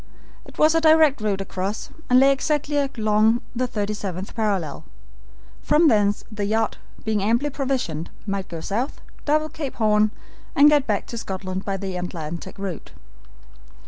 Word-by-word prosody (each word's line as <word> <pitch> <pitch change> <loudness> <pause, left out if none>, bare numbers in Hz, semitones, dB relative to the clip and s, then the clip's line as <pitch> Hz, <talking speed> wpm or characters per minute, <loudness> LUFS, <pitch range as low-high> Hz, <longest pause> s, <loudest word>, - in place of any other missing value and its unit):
It - - -15
was 310 +1 +5
a 325 - +3
direct 315 -5 +5
route 200 -2 0
across, 195 +2 -4 0.2
and 250 0 +6
lay 270 +1 +6
exactly 295 +1 0
along 225 -5 +2 0.2
the 250 +1 0
37th 205 -4 -4
parallel. 200 -10 -1 0.8
From 310 +1 +4
thence 205 -3 +2
the 210 -1 -3
yacht, 220 +2 0 0.3
being 215 -2 +1
amply 235 +8 +1
provisioned, 255 - -2 0.2
might 195 -2 -3
go 165 -1 -6
south, 230 - -2 0.3
double 310 +1 +2
Cape 295 -5 -5
Horn, 215 -1 +3 0.5
and 290 +2 +7
get 290 -3 +3
back 210 -3 0
to 235 - -6
Scotland 190 -2 -5
by 195 -1 -1
the 190 -1 -4
Atlantic 170 0 -6
route. 195 -3 -6
215 Hz, 150 wpm, -23 LUFS, 195-275 Hz, 0.8 s, and